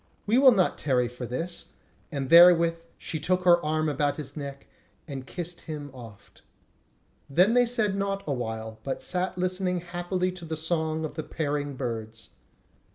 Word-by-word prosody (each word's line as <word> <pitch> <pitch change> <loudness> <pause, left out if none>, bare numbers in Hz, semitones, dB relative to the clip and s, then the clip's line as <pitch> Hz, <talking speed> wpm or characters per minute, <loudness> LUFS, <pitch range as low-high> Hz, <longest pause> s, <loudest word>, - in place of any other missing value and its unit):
We 225 +5 +3
will 270 -1 +8
not 190 -6 +2
tarry 125 -4 +1
for 125 0 -7
this." 165 +9 -3 0.5
And 135 -3 -3
therewith 170 -1 +7 0.2
she 160 - -4
took 180 +4 +1
her 175 -1 +5
arm 155 +1 0
about 145 -1 0
his 145 -2 -7
neck 140 -2 -7 0.4
and 135 -3 -7
kissed 175 -1 -6
him 150 -3 -7
oft. 115 -5 -13 0.9
Then 180 +10 +4
they 245 0 +4
said 220 -5 +1
naught 195 0 -2
awhile, 110 -5 -4
but 135 - -4
sat 185 0 -2
listening 180 0 -1
happily 175 +1 -2
to 180 -1 -11
the 160 -1 -4
song 160 -1 -1
of 155 - -6
the 155 - -4
pairing 145 -2 -3
birds. 115 -3 -5
160 Hz, 160 wpm, -27 LUFS, 140-180 Hz, 0.9 s, will